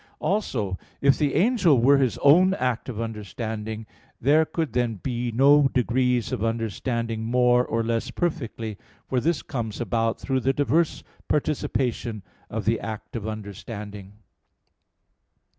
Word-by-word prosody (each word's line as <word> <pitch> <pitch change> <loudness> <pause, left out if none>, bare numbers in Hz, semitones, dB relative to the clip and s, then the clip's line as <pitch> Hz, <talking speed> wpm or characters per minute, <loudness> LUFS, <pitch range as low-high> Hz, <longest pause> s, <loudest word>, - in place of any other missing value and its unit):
Also, 115 - -1 0.2
if 140 -1 +4
the 145 -2 0
angel 180 - +4
were 135 +4 +5
his 130 -4 +1
own 180 +7 +6
act 125 - -1
of 115 -4 -5
understanding, 110 0 -5 0.3
there 150 +5 +4
could 160 -6 -3
then 120 -2 0
be 120 +3 -3
no 140 +4 +5
degrees 125 -1 +1
of 105 - -2
understanding 115 0 -2
more 125 +1 +3
or 115 -1 -1
less 115 +2 -1
perfectly; 115 - -3 0.3
for 130 - +1
this 160 +3 0
comes 115 -6 -4
about 115 -1 0
through 135 -1 0
the 135 +1 +1
diverse 150 +4 +1 0.2
participation 125 -7 -1 0.3
of 110 -2 -4
the 115 +1 +2
act 110 +4 -7
of 110 -2 -4
understanding. 105 -1 -7
120 Hz, 135 wpm, -25 LUFS, 110-140 Hz, 0.3 s, own